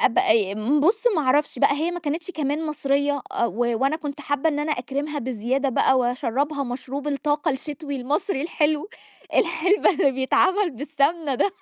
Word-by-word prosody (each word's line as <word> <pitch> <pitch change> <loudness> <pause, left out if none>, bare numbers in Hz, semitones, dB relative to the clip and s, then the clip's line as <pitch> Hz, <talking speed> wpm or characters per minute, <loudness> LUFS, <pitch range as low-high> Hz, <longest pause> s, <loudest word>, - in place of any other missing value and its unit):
أب 230 - +2
أي 205 -3 +3
م 240 +8 +1
بُصّ 415 +10 +2
ما 310 - +2
أعرفش 280 +1 +1
بقى - - +4
هي 310 +4 -1
ما 350 0 -5
كانتش 320 +2 -3
كمان 305 -1 -2
مصرية، 285 -2 0
أ - - 0
و 190 - -6 0.3
وأنا 275 +4 +2
كُنت 295 -2 -6
حابة 285 +1 0
إن 295 -2 -1
أنا 300 +1 0
أكرِِمها 280 +4 -3
بزيادة 255 +2 -1
بقى، 260 +1 +3
وأشرّبها 255 +4 -1
مشروب 265 +3 -5
الطاقة 295 +2 0
الشتوي 285 +1 -5
المصري 280 +5 -1
الحلو، 305 +1 0 0.5
الحلبة 340 +5 +3
اللي 280 -6 +2
بيتعملّ 370 +9 +2
بالسمنة 290 +2 -1
ده. 395 - +1
285 Hz, 170 wpm, -23 LUFS, 265-310 Hz, 0.5 s, بقى